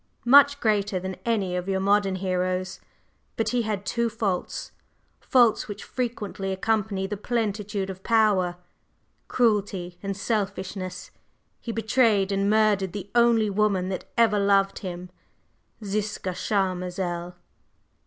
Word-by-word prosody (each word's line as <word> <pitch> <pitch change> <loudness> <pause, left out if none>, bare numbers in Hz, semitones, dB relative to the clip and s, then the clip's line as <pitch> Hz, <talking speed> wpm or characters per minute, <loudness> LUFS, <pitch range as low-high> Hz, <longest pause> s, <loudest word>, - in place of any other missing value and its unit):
"Much 285 +3 +7
greater 205 -4 +1
than 190 +1 -5
any 200 -6 0
of 180 +1 -3
your 190 0 +1
modern 200 0 +2
heroes. 185 0 -2 0.6
But 225 -1 0
he 245 +1 +1
had 210 -3 -3
two 235 +4 0
faults; 210 -5 -3 0.5
faults 240 -4 +3
which 205 -1 -7
frequently 210 -6 -4
accompany 205 0 -1
the 205 +1 -4
plentitude 210 -3 -2
of 190 0 -11
power, 205 -6 +2 0.7
cruelty 205 -7 0
and 195 -1 -4
selfishness. 195 -3 -3 0.5
He 235 - -5
betrayed 220 -3 +2
and 195 0 +1
murdered 210 -4 +2
the 200 -1 -7
only 235 -3 +4
woman 195 -2 +1
that 190 - -4
ever 220 -3 +4
loved 195 -1 +2
him, 180 -2 -7 0.7
Ziska 205 -1 -2
Charmazel." 180 -2 -2
200 Hz, 125 wpm, -25 LUFS, 190-220 Hz, 0.7 s, Much